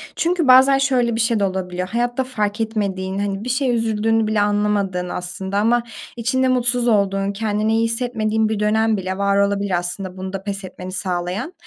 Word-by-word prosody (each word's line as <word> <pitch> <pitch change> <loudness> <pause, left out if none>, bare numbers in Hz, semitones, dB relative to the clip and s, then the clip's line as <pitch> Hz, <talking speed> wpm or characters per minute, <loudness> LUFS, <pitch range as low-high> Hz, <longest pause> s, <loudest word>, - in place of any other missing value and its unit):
çünkü 340 -2 0
bazen 265 +2 +7
şöyle 250 -4 +1
bir - - -2
şey 225 -1 +1
de - - +1
olabiliyor, 185 -1 -2
hayatta 240 +2 0
fark 215 -4 -2
etmediğin, 195 -3 -2
hani, 200 0 -2
bir 250 - -4
şeye 255 0 +1
üzüldüğünü 225 -1 +1
bile 215 -1 +1
anlamadığın 205 -3 0
aslında 190 +3 -4
ama 235 +3 +2 0.3
içinde 260 +3 +1
mutsuz 245 -1 +1
olduğun, 200 -2 +1
kendini 215 +1 -1
iyi 225 - +2
hissetmediğin 220 -2 0
bir 215 -2 -2
dönem 220 +1 +2
bile 185 0 -4
var 200 0 +1
olabilir 200 -2 +1
aslında 180 +1 -4
bunda 190 +1 -5
pes 200 -1 -4
etmeni 185 0 -8
sağlayan. 185 - -3
210 Hz, 175 wpm, -20 LUFS, 195-235 Hz, 0.3 s, bazen